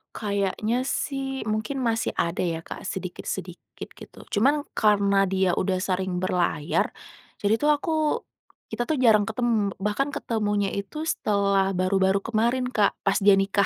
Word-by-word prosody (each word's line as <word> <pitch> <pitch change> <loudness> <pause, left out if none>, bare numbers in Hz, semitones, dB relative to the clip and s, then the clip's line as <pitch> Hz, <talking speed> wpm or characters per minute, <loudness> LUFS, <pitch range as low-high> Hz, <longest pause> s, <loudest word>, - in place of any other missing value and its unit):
Kayaknya 210 +3 -1
sih 270 -1 -3
mungkin 215 +5 -2
masih 225 -1 0
ada 170 - 0
ya 165 -2 -2
Kak, - - -7
sedikit-sedikit - - -6
gitu, - - -14 0.2
cuman 285 +4 +3
karena 200 -2 +3
dia 190 -2 +2
udah 185 0 0
sering 185 -1 -1
berlayar 175 -4 0 0.5
jadi 210 +2 +1
tuh 295 - +3
aku. 300 +3 0 0.8
Kita 240 - -2
tuh 285 -1 -1
jarang 215 -4 +5
ketem 220 -3 0
bahkan 270 +8 -1
ketemunya 205 -3 -1
itu 200 +12 -5
setelah 200 -9 +1
baru-baru 190 +1 +2
kemarin 235 +4 0
Kak, 210 -5 +2
pas 195 +1 +1
dia 205 -1 +5
nikah. 195 0 +2
205 Hz, 140 wpm, -25 LUFS, 195-235 Hz, 0.8 s, jarang